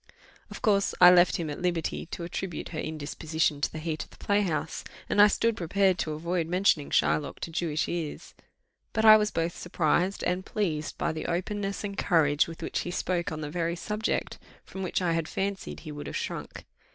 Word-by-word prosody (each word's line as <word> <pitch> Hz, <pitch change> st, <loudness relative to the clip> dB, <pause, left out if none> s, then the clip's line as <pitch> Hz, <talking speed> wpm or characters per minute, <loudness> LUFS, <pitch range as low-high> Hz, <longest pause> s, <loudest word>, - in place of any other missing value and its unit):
Of -, -, -10 dB
course, 200 Hz, -3 st, +2 dB
I 180 Hz, 0 st, +10 dB
left 180 Hz, 0 st, +5 dB
him 165 Hz, -, -2 dB
at 145 Hz, -, -6 dB
liberty 175 Hz, -2 st, -1 dB
to 175 Hz, -, -6 dB
attribute 175 Hz, 0 st, -4 dB
her 155 Hz, -, -5 dB
indisposition 155 Hz, 0 st, -2 dB
to -, -, 0 dB
the -, -, -7 dB
heat 155 Hz, -1 st, -3 dB
of -, -, -18 dB
the -, -, -18 dB
playhouse, 170 Hz, -7 st, 0 dB, 0.2 s
and 205 Hz, -, +4 dB
I 205 Hz, -, +9 dB
stood 230 Hz, +2 st, +1 dB
prepared 190 Hz, +1 st, +1 dB
to 155 Hz, -, -1 dB
avoid 170 Hz, +2 st, -1 dB
mentioning 180 Hz, -4 st, +2 dB
Shylock 150 Hz, -, +1 dB
to 165 Hz, -, -4 dB
Jewish 160 Hz, -2 st, -1 dB
ears; 165 Hz, -3 st, -4 dB, 0.6 s
but 220 Hz, 0 st, +1 dB
I 215 Hz, 0 st, +11 dB
was 210 Hz, -1 st, +3 dB
both 165 Hz, -2 st, -2 dB
surprised 175 Hz, +2 st, 0 dB
and 180 Hz, +1 st, 0 dB
pleased 160 Hz, -8 st, -2 dB
by -, -, 0 dB
the 160 Hz, 0 st, -5 dB
openness 195 Hz, +4 st, -2 dB
and 200 Hz, -1 st, -4 dB
courage 155 Hz, -7 st, +3 dB
with 165 Hz, -1 st, -8 dB
which -, -, -2 dB
he -, -, -4 dB
spoke 175 Hz, -1 st, -1 dB
on 155 Hz, -1 st, -5 dB
the 150 Hz, -1 st, -5 dB
very 170 Hz, 0 st, -1 dB
subject 210 Hz, +5 st, -2 dB, 0.3 s
from 190 Hz, -, -8 dB
which 185 Hz, 0 st, -1 dB
I 170 Hz, -2 st, +2 dB
had 165 Hz, -1 st, -1 dB
fancied 195 Hz, 0 st, -3 dB
he 155 Hz, -, -8 dB
would 145 Hz, 0 st, -7 dB
have -, -, -3 dB
shrunk. -, -, -5 dB
175 Hz, 200 wpm, -28 LUFS, 160-195 Hz, 0.6 s, I